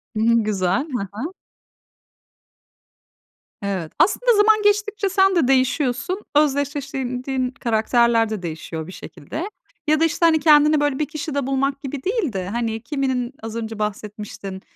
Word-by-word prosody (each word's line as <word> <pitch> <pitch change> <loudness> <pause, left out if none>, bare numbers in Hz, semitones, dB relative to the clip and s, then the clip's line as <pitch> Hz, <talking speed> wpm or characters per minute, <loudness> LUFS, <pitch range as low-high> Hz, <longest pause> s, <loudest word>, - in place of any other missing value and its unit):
Hı - - -1
hı 230 0 +4
güzel, 205 - 0
hı 200 -5 -2
hı. 295 - -5 2.3
Evet. 190 -5 -3
Aslında 480 +5 +4
zaman 430 +1 +5
geçtikçe 415 -1 +1
sen 385 0 +3
de 305 -7 +3
değişiyorsun. 270 +7 +1
Özdeşleştirdiğin 275 -3 0
diğin 260 -2 -1
karakterler 230 -1 +2
de 215 -3 -4
değişiyor 160 -1 -6
bir - - -8
şekilde. 310 - -7 0.4
Ya 310 0 +3
da 325 - +4
işte 330 +1 +1
hani 320 -1 +5
kendini 300 0 +5
böyle 290 -2 0
bir 300 - +1
kişide 290 -3 -3
bulmak 275 +1 0
gibi 270 -1 -5
değil 390 - -1
de, 185 -1 -3
hani, 225 -1 -2
kiminin 260 -2 -2
az 225 0 -6
önce 225 -1 -5
bahsetmiştin, 210 -2 -5
265 Hz, 145 wpm, -22 LUFS, 220-310 Hz, 2.3 s, zaman